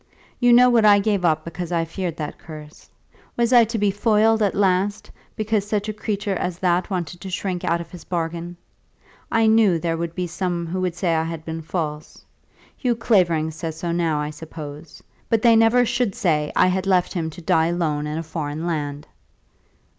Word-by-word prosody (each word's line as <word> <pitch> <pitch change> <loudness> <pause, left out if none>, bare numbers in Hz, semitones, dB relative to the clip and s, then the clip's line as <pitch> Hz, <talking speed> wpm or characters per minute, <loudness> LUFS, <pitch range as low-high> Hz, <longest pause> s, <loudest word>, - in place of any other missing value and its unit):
You 245 -1 +4
know 245 +1 +7
what 240 -3 +4
I 205 -1 +7
gave 200 -2 0
up 155 -2 +1
because 170 +1 -6
I 165 -1 +1
feared 170 0 -4
that 150 -2 -5
curse. 155 -2 -12 0.5
Was 235 +1 +2
I 240 -2 +7
to 225 +1 -3
be 205 -1 +2
foiled 220 +2 +2
at 205 -2 +1
last, 195 +1 0 0.2
because 215 -1 -1
such 210 0 -1
a 215 - -2
creature 205 -1 -3
as 180 -1 -3
that 180 +1 +1
wanted 175 -2 -4
to 190 - -6
shirk 185 -1 -3
out 170 +1 +1
of 170 -1 -9
his 175 -3 -10
bargain? 170 0 -4 0.7
I 225 -1 +3
knew 220 -5 +4
there 165 0 -2
were 170 0 -2 0.2
some 175 0 -3
who 185 +3 -3
would 180 -2 -1
say 175 -2 0
I 160 0 +1
had 165 -1 -6
been 160 0 -5
false. 155 -2 -5 0.5
Hugh 245 -3 0
Clavering 175 -9 +2
says 160 0 -6
so 170 +1 -3
now, 165 -3 0
I 150 0 -3
suppose. 155 -1 -10 0.3
But 225 -1 +1
they 230 -1 +6
never 225 +2 +4
should 240 -3 -1
say 150 -4 0
I - - +5
had 185 +1 0
left 185 -2 +2
him 165 -4 -2
to 160 - -11
die 160 0 +3
alone 155 -4 -1
in 150 +1 -3
a 165 - -3
foreign 155 0 -4
land." 150 -3 -3
175 Hz, 200 wpm, -22 LUFS, 160-205 Hz, 0.7 s, know